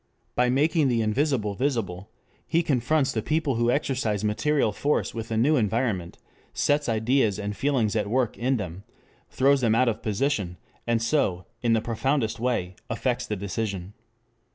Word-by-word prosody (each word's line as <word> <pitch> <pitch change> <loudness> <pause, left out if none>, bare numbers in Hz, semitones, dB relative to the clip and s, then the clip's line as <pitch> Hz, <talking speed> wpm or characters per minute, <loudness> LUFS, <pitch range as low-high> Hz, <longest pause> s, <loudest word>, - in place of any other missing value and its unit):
By 125 0 +2
making 150 +3 +3
the 120 -3 +1
invisible 110 -2 0
visible, 105 -6 -2 0.4
he 170 +1 +2
confronts 140 +1 +1
the 110 - -1
people 155 +1 0
who 120 0 +2
exercise 125 -6 0
material 110 +4 +1
force 145 +7 0
with 115 -1 -5
a 110 - -1
new 145 +7 +3
environment, 110 -6 -1 0.4
sets 145 -2 +1
ideas 110 -1 +2
and 105 0 -4
feelings 125 -6 +1
at 105 -2 0
work 125 -1 +1
in 130 +2 0
them, 95 -2 -6 0.5
throws 135 +1 +3
them 115 -2 +3
out 130 +2 +3
of 110 -2 -1
position, 105 -5 -1 0.3
and 115 -1 +1
so, 110 -9 +1 0.2
in 115 -2 +2
the 110 - +2
profoundest 120 +1 -1
way, 115 -7 -1 0.2
affects 125 +2 -1
the 105 - -2
decision. 100 -1 -4
115 Hz, 160 wpm, -26 LUFS, 105-135 Hz, 0.5 s, making